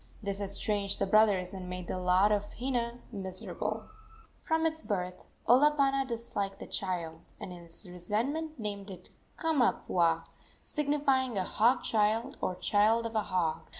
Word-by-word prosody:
This 200 0 -3
estranged 200 0 0
the 200 - +1
brothers 195 -3 +4
and 185 -2 -6
made 180 -1 -5
the 185 - -2
lot 185 +3 +4
of 205 -1 0
Hina 240 -1 -2
miserable. 190 -3 -4 0.6
From 320 0 +1
its 320 0 0
birth 180 -4 -3 0.2
Olopana 275 +1 +4
disliked 225 -5 -3
the - - -8
child, 170 -4 -3 0.2
and 180 - -7
in 175 - -9
his 170 +3 -7
resentment 235 - -2
named 205 -2 -4
it 185 - -10 0.3
Kamapuaa, 180 - +2 0.4
signifying 275 -5 +1
a 190 - +1
hog 235 +7 +3
child, 225 +5 +1
or 185 - -1
child 215 +5 +3
of 230 - -4
a 215 - +3
hog. 170 -5 -1
210 Hz, 150 wpm, -31 LUFS, 185-250 Hz, 0.6 s, brothers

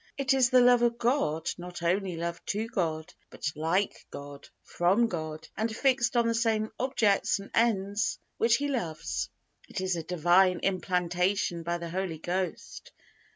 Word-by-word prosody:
It 275 -1 +2
is 260 -2 +4
the 255 -1 +6
love 245 -1 +6
of 235 -1 +2
God 230 - 0
not 175 0 -8
only 185 +1 0
love 170 0 -4
to 210 +2 -1
God, 160 -7 -2 0.2
but 155 - -4
like 165 +6 -1
God, 140 0 -10
from 190 +7 +2
God, 155 -6 -5
and 220 +1 -2
fixed 255 -3 +2
on 235 - +4
the 230 - +2
same 225 -2 0
objects 225 -8 +2
and 200 0 -10
ends 205 -3 +1 0.2
which 230 0 +4
He 285 +2 -1
loves. 160 - -3 0.4
It - - -4
is 185 -1 0
a 165 - -3
Divine 180 +2 +3
implantation 180 -1 0
by 170 +1 -2
the 170 -1 -7
Holy 185 -2 -2
Ghost. 180 +2 -4
190 Hz, 160 wpm, -29 LUFS, 170-230 Hz, 0.4 s, the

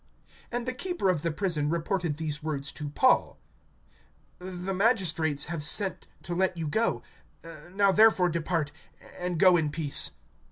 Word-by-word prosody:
(36)And 240 0 -2
the 255 - -1
keeper 350 - -2
of 165 -5 -2
the 165 - -1
prison 155 -3 -1
reported 170 -1 -2
these 155 -1 -4
words 145 -3 -4
to 150 -2 -6
Paul: 255 - +2 1.0
The 185 +1 -5
magistrates 180 - +1
have 170 -3 -5
sent 190 +6 +1 0.2
to 175 - -5
let 185 0 0
you 160 -2 -3
go; 220 +10 0 0.7
now 200 +1 +3
therefore 205 -3 +5
depart, 165 -2 -2 0.5
and 180 -1 -2
go 185 -1 +6
in 155 -3 0
peace. 145 -1 +2
175 Hz, 150 wpm, -27 LUFS, 155-195 Hz, 1.0 s, go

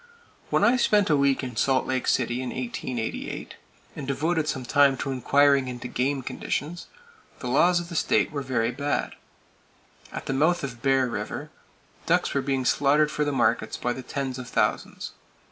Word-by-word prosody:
When - - +2
I 250 +2 +5
spent 205 -7 +3
a - - +5
week 140 -1 +2
in 125 -3 -5
Salt 135 -1 +2
Lake 130 -1 -2
City 120 0 +1
in 130 - -4
1888, 120 -2 -4 0.4
and 140 - -6
devoted 155 +3 0
some 130 -4 -2
time 140 +1 +4
to 135 - -3
inquiring 140 +1 +3
into 125 0 -5
game 135 +2 -1
conditions, 160 +7 -4 0.5
the - - -9
laws 175 +8 +4
of 175 0 -7
the 170 - -7
state - - +2
were 145 -2 -3
very 125 -3 0
bad. 140 +3 -2 1.0
At - - -6
the - - -2
mouth 160 +5 +2
of 120 -4 -6
Bear 135 -1 +3
River, 120 - -5 0.6
ducks - - +2
were 140 - +1
being 135 -1 -1
slaughtered 145 +3 +3
for 150 - 0
the 145 - 0
markets 120 -4 +1
by 125 - -1
the 130 - -7
tens 130 0 -4
of 125 -2 -8
thousands. - - -1
135 Hz, 180 wpm, -26 LUFS, 125-145 Hz, 1.0 s, I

